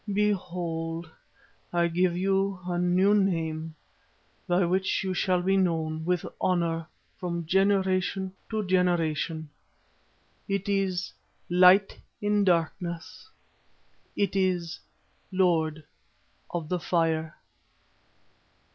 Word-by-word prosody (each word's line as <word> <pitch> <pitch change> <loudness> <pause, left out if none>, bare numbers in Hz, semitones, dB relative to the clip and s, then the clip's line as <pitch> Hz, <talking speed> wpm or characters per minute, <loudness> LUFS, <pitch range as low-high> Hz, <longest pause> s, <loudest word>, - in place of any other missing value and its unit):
Behold! 175 -5 -1 0.6
I 170 0 +2
give 175 +1 +1
you 195 0 +1
a 175 -1 -1
new 180 +3 +3
name, 165 -5 0 0.7
by 180 +1 +3
which 190 +3 0
you 190 -1 -1
shall 180 0 +1
be 195 +1 +2
known 160 -3 0
with 180 -1 0 0.2
honour 170 -3 0 0.3
from 170 -2 -3
generation 190 +1 +1 0.2
to 215 -2 -2
generation. 165 -4 0 1.0
It 200 0 -2
is 195 -2 -1 0.4
'Light 185 +2 +5 0.2
in 205 0 +2
Darkness.' 170 - -1 0.9
It 200 -1 0
is 180 -3 0 0.5
'Lord 160 -4 +1 0.7
of 170 -3 -4
the 180 +2 -1
Fire. 160 -2 0
180 Hz, 95 wpm, -27 LUFS, 165-190 Hz, 1.0 s, Light